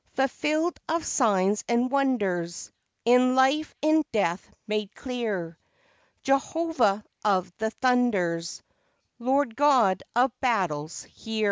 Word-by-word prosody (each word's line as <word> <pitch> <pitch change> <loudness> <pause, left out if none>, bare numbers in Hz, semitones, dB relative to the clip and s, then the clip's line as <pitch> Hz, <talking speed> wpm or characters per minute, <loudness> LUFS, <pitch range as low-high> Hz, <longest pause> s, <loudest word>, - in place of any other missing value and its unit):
Fulfilled 305 +5 0
of 330 +1 -1
signs 205 -4 +1
and 240 +2 +1
wonders, 200 -12 -1 0.3
In 250 +1 +4
life, 270 +4 +2
in 310 0 +4
death 190 -5 -1 0.2
made 210 -1 -3
clear 210 -11 -4 0.6
Jehovah 270 -6 +1 0.2
of 185 -4 0
the 220 0 0
Thunders, 210 -10 0 0.6
Lord 260 0 0
God 250 -10 +3
of 250 +2 +3
Battles, 175 - -1
hear! 225 -1 -7
235 Hz, 105 wpm, -26 LUFS, 195-270 Hz, 0.6 s, In